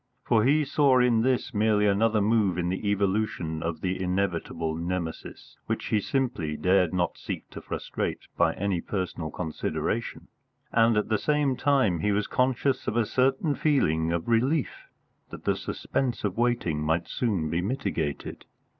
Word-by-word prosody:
For 110 -2 +3
he 150 +3 +3
saw 140 -2 +3
in 125 -3 +4
this 130 +1 0
merely 105 -1 +3
another 105 +2 +3
move 105 -4 +2
in 90 0 0
the 95 +3 -2
evolution 100 -5 0
of 85 0 -3
the 95 0 -2
inevitable 90 -3 -1
Nemesis 85 0 -5
which - - -2
he 110 - +3
simply 100 - -1
dared 90 +1 +3
not 90 -2 -1
seek - - -5
to - - -8
frustrate - - -4
by - - +2
any 95 -3 -1
personal 90 -5 -3
consideration; 80 -2 -3 0.4
and 115 -1 +4
at 105 - 0
the 110 - +1
same 150 -3 +1
time 130 - +2
he 105 +6 +1
was 100 0 +1
conscious 130 +1 0
of 110 - 0
a 115 - +3
certain 135 +6 +1
feeling 80 - +1
of 85 -1 -2
relief 130 +6 0 0.4
that - - -10
the - - +1
suspense 125 -6 -3
of 100 -2 -1
waiting 120 -10 0
might 80 +2 0
soon 95 -11 -1
be 85 - 0
mitigated. 85 - -3
105 Hz, 160 wpm, -27 LUFS, 85-125 Hz, 0.4 s, in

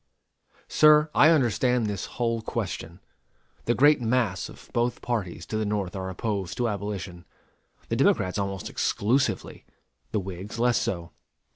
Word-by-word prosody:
Sir, 150 0 +5
I 155 - +6
understand 125 -5 +2
this 100 -3 -3
whole 115 -2 0
question. 85 -4 -5 0.6
The 120 - +2
great 145 +1 +5
mass 115 -5 0
of - - -15
both 120 0 0
parties 95 -8 -3
to 110 - -3
the 110 - 0
North 100 -3 -2
are 95 -1 -4
opposed 95 -1 -3
to 120 - +1
abolition: 100 -4 -5 0.6
the - - -1
Democrats 90 +2 +2
almost 95 -2 -3
exclusively; 125 +7 0 0.5
the 110 - 0
Whigs 95 +3 -7
less 120 -3 +3
so. 85 -3 -3
105 Hz, 140 wpm, -26 LUFS, 95-120 Hz, 0.6 s, I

